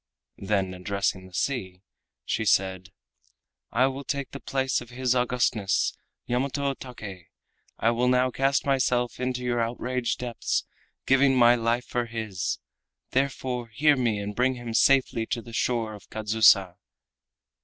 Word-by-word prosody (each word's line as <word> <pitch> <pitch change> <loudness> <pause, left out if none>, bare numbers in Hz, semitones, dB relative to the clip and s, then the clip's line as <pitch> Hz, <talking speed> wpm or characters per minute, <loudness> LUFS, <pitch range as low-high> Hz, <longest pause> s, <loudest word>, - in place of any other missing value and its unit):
Then 95 -2 0
addressing 95 0 -2
the 95 - -19
sea 95 -9 -2 0.4
she - - -1
said: 95 -2 +1 0.8
"I 125 +2 +3
will 135 +1 -3
take 140 -1 -3
the 140 - -7
place 135 -2 -1
of 120 - -11
His 125 0 0
Augustness, 120 -6 +1 0.3
Yamato 140 +3 -1
Take. 105 -10 -9 0.5
I 115 - +2
will 120 +1 +1
now 125 0 +3
cast 135 +2 +1
myself 125 -3 +1
into 125 0 -2
your 120 -1 0
outraged 120 0 -2
depths, 120 -2 -2 0.4
giving 135 0 +4
my 120 -1 +7
life 120 0 0
for 120 -1 -2
his. 110 -6 -3 0.5
Therefore 130 -2 -1
hear 145 +6 +3
me 120 -5 0
and 100 0 -5
bring 130 +1 +2
him 120 -2 -6
safely 125 -2 +3
to 125 -1 -2
the 115 0 -11
shore 115 -2 0
of 105 - -13
Kadzusa." 105 -4 +4
120 Hz, 145 wpm, -26 LUFS, 110-130 Hz, 0.8 s, my